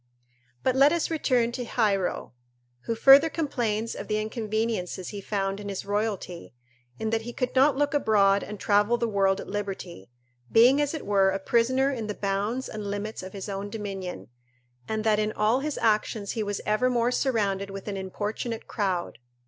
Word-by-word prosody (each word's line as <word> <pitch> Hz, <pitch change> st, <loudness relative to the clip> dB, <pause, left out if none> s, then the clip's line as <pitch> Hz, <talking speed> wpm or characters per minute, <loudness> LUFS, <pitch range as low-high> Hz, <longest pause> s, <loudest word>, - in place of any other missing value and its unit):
But 260 Hz, -, +2 dB
let 275 Hz, +2 st, +6 dB
us 340 Hz, 0 st, 0 dB
return 250 Hz, -7 st, +1 dB
to 245 Hz, +1 st, -4 dB
Hiero, 210 Hz, -, 0 dB, 0.5 s
who 230 Hz, -, -1 dB
further 275 Hz, +7 st, +7 dB
complains 230 Hz, -9 st, -2 dB
of -, -, -7 dB
the 215 Hz, 0 st, 0 dB
inconveniences 215 Hz, -4 st, -2 dB
he 205 Hz, -2 st, -6 dB
found 195 Hz, -1 st, -2 dB
in 205 Hz, -1 st, -6 dB
his 195 Hz, -, -5 dB
royalty, 205 Hz, -, -3 dB, 0.4 s
in 220 Hz, 0 st, -2 dB
that 225 Hz, 0 st, +1 dB
he 240 Hz, +2 st, -7 dB
could 250 Hz, +1 st, -3 dB
not 270 Hz, +1 st, +4 dB
look 290 Hz, 0 st, +1 dB
abroad 200 Hz, -7 st, +3 dB
and 210 Hz, -1 st, -7 dB
travel 210 Hz, +4 st, +3 dB
the 235 Hz, -, 0 dB
world 195 Hz, -2 st, +2 dB
at -, -, -7 dB
liberty, 195 Hz, -, -5 dB, 0.4 s
being 250 Hz, +6 st, +6 dB
as 290 Hz, +2 st, -1 dB
it 310 Hz, -, -6 dB
were 195 Hz, -1 st, +3 dB
a 190 Hz, -, 0 dB
prisoner 250 Hz, +7 st, +2 dB
in 230 Hz, -5 st, -4 dB
the 210 Hz, -, -4 dB
bounds 205 Hz, +6 st, -2 dB
and 210 Hz, -2 st, -6 dB
limits 205 Hz, +2 st, -4 dB
of 185 Hz, 0 st, -9 dB
his 195 Hz, -1 st, -6 dB
own 200 Hz, 0 st, -4 dB
dominion, 195 Hz, -, -6 dB, 0.6 s
and 220 Hz, 0 st, -2 dB
that 215 Hz, -1 st, +3 dB
in 215 Hz, 0 st, 0 dB
all 220 Hz, +4 st, +2 dB
his 295 Hz, +1 st, -3 dB
actions 215 Hz, -2 st, 0 dB
he 225 Hz, -, -3 dB
was 205 Hz, -1 st, -3 dB
evermore 240 Hz, +2 st, +2 dB
surrounded 200 Hz, -7 st, 0 dB
with 195 Hz, +1 st, -8 dB
an 205 Hz, -, -3 dB
importunate 210 Hz, +4 st, -4 dB
crowd. 190 Hz, -5 st, -2 dB
215 Hz, 180 wpm, -26 LUFS, 200-240 Hz, 0.6 s, further